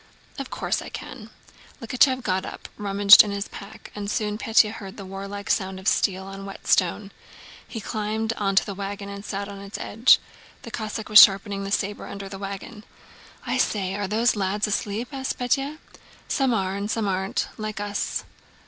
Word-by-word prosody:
"Of 275 Hz, -, -5 dB
course -, -, -2 dB
I -, -, -8 dB
can." -, -, -9 dB, 0.5 s
Likhachëv 255 Hz, +2 st, +2 dB
got 185 Hz, -1 st, 0 dB
up, -, -, -8 dB
rummaged 200 Hz, 0 st, +7 dB
in 210 Hz, -, -4 dB
his 200 Hz, 0 st, -3 dB
pack, 200 Hz, +1 st, -11 dB
and 205 Hz, -1 st, -5 dB
soon 210 Hz, -1 st, -1 dB
Pétya 220 Hz, -2 st, +4 dB
heard 195 Hz, -3 st, -9 dB
the 200 Hz, -, -8 dB
warlike 200 Hz, +1 st, -7 dB
sound 190 Hz, -1 st, -1 dB
of 190 Hz, -, -7 dB
steel 190 Hz, -3 st, +2 dB
on 195 Hz, 0 st, -8 dB
whetstone. 195 Hz, 0 st, 0 dB, 0.6 s
He 225 Hz, -, -6 dB
climbed 220 Hz, +1 st, -2 dB
onto 195 Hz, -3 st, +2 dB
the 200 Hz, -, -5 dB
wagon 200 Hz, +1 st, -5 dB
and 200 Hz, 0 st, -7 dB
sat 200 Hz, -1 st, -4 dB
on 200 Hz, -1 st, -8 dB
its 200 Hz, +1 st, -7 dB
edge. 230 Hz, +5 st, +4 dB, 0.5 s
The 230 Hz, -, -9 dB
Cossack 215 Hz, -1 st, -4 dB
was 215 Hz, 0 st, +10 dB
sharpening 195 Hz, 0 st, +4 dB
the 195 Hz, -, -5 dB
saber 205 Hz, +1 st, -1 dB
under 200 Hz, 0 st, -7 dB
the 195 Hz, 0 st, -8 dB
wagon. 200 Hz, +2 st, -7 dB, 0.6 s
"I -, -, -1 dB
say! 190 Hz, -3 st, 0 dB
Are 200 Hz, 0 st, -2 dB
the 220 Hz, +4 st, 0 dB
lads 200 Hz, +1 st, 0 dB
asleep?" 210 Hz, +3 st, -2 dB
asked 265 Hz, -1 st, -3 dB
Pétya. 275 Hz, +4 st, 0 dB, 0.5 s
"Some 270 Hz, -3 st, +1 dB
are, 190 Hz, -4 st, 0 dB
and 200 Hz, +1 st, -3 dB
some 220 Hz, -2 st, 0 dB
aren't—like 195 Hz, +2 st, -2 dB
us." 205 Hz, 0 st, -2 dB
205 Hz, 175 wpm, -24 LUFS, 195-215 Hz, 0.6 s, was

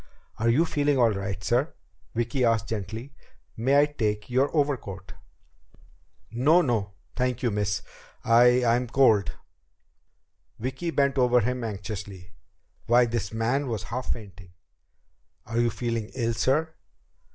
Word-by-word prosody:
"Are 115 Hz, +1 st, +2 dB
you 145 Hz, +9 st, +3 dB
feeling 145 Hz, -3 st, +1 dB
all 120 Hz, -3 st, +4 dB
right, 100 Hz, -1 st, -4 dB
sir?" 125 Hz, +8 st, 0 dB, 0.4 s
Vicki 120 Hz, +3 st, -1 dB
asked 115 Hz, -3 st, +1 dB
gently. 110 Hz, +5 st, -5 dB, 0.4 s
"May 135 Hz, +5 st, +3 dB
I -, -, +5 dB
take 110 Hz, -7 st, -3 dB
your 130 Hz, +3 st, +2 dB
overcoat?" 130 Hz, -, -2 dB, 1.2 s
"No 150 Hz, +10 st, +4 dB
no, 110 Hz, -6 st, -1 dB, 0.2 s
thank 125 Hz, 0 st, -1 dB
you, 120 Hz, -, +1 dB
miss. 105 Hz, -1 st, -1 dB, 0.4 s
I 125 Hz, +2 st, +5 dB
I'm 120 Hz, +2 st, +2 dB
cold." 115 Hz, -6 st, +3 dB, 1.2 s
Vicki 130 Hz, +8 st, -4 dB
bent 140 Hz, -3 st, +1 dB
over 125 Hz, -1 st, +4 dB
him 125 Hz, +2 st, -2 dB
anxiously. 100 Hz, -3 st, -6 dB, 0.6 s
Why, 120 Hz, +1 st, +5 dB
this 115 Hz, -3 st, -3 dB
man 120 Hz, +6 st, 0 dB
was 115 Hz, -4 st, -3 dB
half 125 Hz, +1 st, -2 dB
fainting! 95 Hz, -4 st, -11 dB, 1.0 s
"Are 115 Hz, +1 st, -2 dB
you 120 Hz, 0 st, +3 dB
feeling 115 Hz, -2 st, -3 dB
ill, 115 Hz, -2 st, 0 dB
sir?" 155 Hz, +7 st, 0 dB
120 Hz, 130 wpm, -26 LUFS, 105-130 Hz, 1.2 s, I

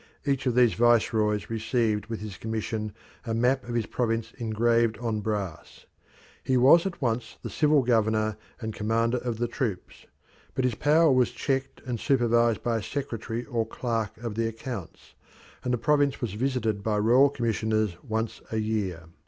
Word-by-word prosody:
Each 140 Hz, -2 st, 0 dB
of 120 Hz, -, +1 dB
these 125 Hz, -3 st, +5 dB
viceroys 110 Hz, -3 st, +2 dB
received 110 Hz, -2 st, 0 dB
with 115 Hz, -2 st, -5 dB
his 105 Hz, -3 st, -6 dB
commission 110 Hz, 0 st, -3 dB, 0.3 s
a 115 Hz, -3 st, -2 dB
map 125 Hz, +2 st, +1 dB
of 120 Hz, -, -3 dB
his 115 Hz, -2 st, +1 dB
province 115 Hz, -1 st, -2 dB
engraved 115 Hz, 0 st, +2 dB
on 115 Hz, -1 st, -2 dB
brass. 100 Hz, -5 st, -4 dB, 0.6 s
He 130 Hz, -, +2 dB
was 155 Hz, +9 st, +6 dB
at 175 Hz, -6 st, -6 dB
once 115 Hz, -1 st, -2 dB
the -, -, -5 dB
civil 150 Hz, -2 st, +3 dB
governor 110 Hz, -2 st, +2 dB, 0.2 s
and 110 Hz, -2 st, -4 dB
commander 115 Hz, +3 st, 0 dB
of 120 Hz, -2 st, -3 dB
the 120 Hz, +1 st, 0 dB
troops, 115 Hz, -7 st, -4 dB, 0.5 s
but 130 Hz, -, 0 dB
his 125 Hz, -, +1 dB
power 155 Hz, +5 st, +4 dB
was 130 Hz, -2 st, +3 dB
checked 135 Hz, +2 st, -2 dB
and 120 Hz, -3 st, -3 dB
supervised 120 Hz, -4 st, +2 dB
by 115 Hz, -1 st, +1 dB
a -, -, -3 dB
secretary 120 Hz, -1 st, -4 dB
or 115 Hz, -2 st, -1 dB
clerk 115 Hz, -1 st, -3 dB
of 115 Hz, -1 st, -5 dB
the 115 Hz, +1 st, 0 dB
accounts, 115 Hz, -4 st, -7 dB, 0.5 s
and 125 Hz, -, -1 dB
the 125 Hz, -, +2 dB
province 145 Hz, +2 st, +2 dB
was 115 Hz, -6 st, -3 dB
visited 115 Hz, -3 st, -1 dB
by 105 Hz, 0 st, 0 dB
royal 120 Hz, +7 st, +5 dB
commissioners 110 Hz, -6 st, 0 dB
once 110 Hz, 0 st, -3 dB
a 110 Hz, -, -1 dB
year. 105 Hz, -6 st, -2 dB
115 Hz, 170 wpm, -27 LUFS, 110-125 Hz, 0.6 s, was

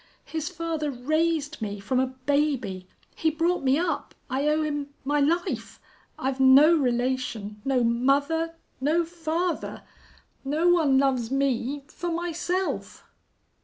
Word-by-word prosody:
His 320 Hz, 0 st, -3 dB
father 330 Hz, -4 st, -3 dB
raised 310 Hz, +2 st, -1 dB
me 205 Hz, -1 st, -3 dB
from 250 Hz, +6 st, 0 dB
a 260 Hz, -, +2 dB
baby. 260 Hz, -8 st, -1 dB, 0.3 s
He 320 Hz, -, +1 dB
brought 335 Hz, +3 st, 0 dB
me 265 Hz, +1 st, +3 dB
up. 330 Hz, -2 st, -2 dB, 0.2 s
I 275 Hz, +3 st, 0 dB
owe 305 Hz, +1 st, +2 dB
him 290 Hz, -2 st, -2 dB, 0.2 s
my 290 Hz, +1 st, +1 dB
life.... 305 Hz, -, -1 dB, 0.4 s
I've 265 Hz, 0 st, -2 dB
no 270 Hz, +5 st, +7 dB
relation 245 Hz, -6 st, -1 dB
no 265 Hz, -3 st, +2 dB
mother 280 Hz, +8 st, +1 dB, 0.3 s
no 320 Hz, +5 st, +2 dB
father! 335 Hz, +1 st, -3 dB, 0.6 s
No 305 Hz, +6 st, +2 dB
one 315 Hz, -6 st, +4 dB
loves 260 Hz, -4 st, +2 dB
me 275 Hz, +1 st, 0 dB
for 350 Hz, +3 st, -5 dB
myself!" 350 Hz, +2 st, -2 dB
290 Hz, 130 wpm, -26 LUFS, 260-325 Hz, 0.6 s, no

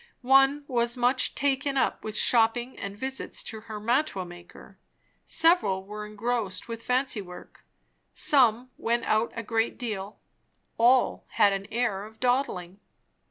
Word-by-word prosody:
One 270 Hz, +2 st, +4 dB
was 240 Hz, -1 st, 0 dB
much 250 Hz, +2 st, +2 dB
taken 275 Hz, 0 st, 0 dB
up -, -, 0 dB
with 215 Hz, -1 st, -4 dB
shopping 235 Hz, +2 st, +2 dB
and 200 Hz, 0 st, -6 dB
visits 265 Hz, +4 st, -4 dB
to 220 Hz, -, -7 dB
her 215 Hz, -1 st, -8 dB
mantua 235 Hz, -3 st, 0 dB
maker; 175 Hz, 0 st, -14 dB, 0.5 s
several 220 Hz, -, +3 dB
were 210 Hz, +1 st, -7 dB
engrossed 215 Hz, -2 st, -3 dB
with 230 Hz, -1 st, -6 dB
fancy 250 Hz, -2 st, 0 dB
work; 180 Hz, -2 st, -13 dB, 0.5 s
some 250 Hz, -3 st, +2 dB
went 235 Hz, 0 st, 0 dB
out 220 Hz, +2 st, +1 dB
a 230 Hz, -, -4 dB
great 225 Hz, +1 st, -1 dB
deal; 210 Hz, -4 st, -5 dB, 0.6 s
all 245 Hz, +2 st, +3 dB
had 200 Hz, -1 st, +4 dB
an 195 Hz, 0 st, -4 dB
air 225 Hz, -4 st, -1 dB
of 220 Hz, +1 st, -13 dB
dawdling. 245 Hz, -8 st, -1 dB
230 Hz, 140 wpm, -27 LUFS, 210-255 Hz, 0.6 s, One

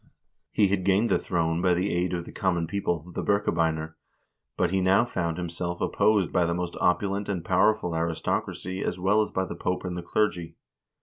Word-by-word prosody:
He 105 Hz, -, +3 dB
had 95 Hz, -1 st, 0 dB
gained 100 Hz, +5 st, +2 dB
the -, -, +3 dB
throne 85 Hz, -1 st, 0 dB
by 90 Hz, -1 st, +3 dB
the 90 Hz, +3 st, 0 dB
aid 90 Hz, +1 st, 0 dB
of 85 Hz, -1 st, -4 dB
the -, -, -10 dB
common 90 Hz, -4 st, 0 dB
people, 85 Hz, -2 st, -2 dB
the -, -, -3 dB
Birkebeiner, 80 Hz, -5 st, 0 dB, 0.6 s
but 90 Hz, -, +1 dB
he 95 Hz, 0 st, +1 dB
now 95 Hz, +4 st, +4 dB
found 85 Hz, -8 st, -2 dB
himself 85 Hz, 0 st, -4 dB
opposed 105 Hz, -4 st, +2 dB
by 90 Hz, -, +3 dB
the 85 Hz, -, 0 dB
most 90 Hz, -1 st, -3 dB
opulent 100 Hz, +3 st, +1 dB
and 90 Hz, -4 st, -3 dB
powerful 95 Hz, -1 st, +2 dB
aristocracy 85 Hz, +3 st, -2 dB
as 90 Hz, -, -2 dB
well 100 Hz, +4 st, +3 dB
as 105 Hz, -, -1 dB
by 95 Hz, -, -1 dB
the -, -, -6 dB
Pope 90 Hz, +1 st, -2 dB
and 90 Hz, -1 st, -3 dB
the 90 Hz, -, -4 dB
clergy. 85 Hz, -2 st, -1 dB
90 Hz, 195 wpm, -26 LUFS, 85-100 Hz, 0.6 s, now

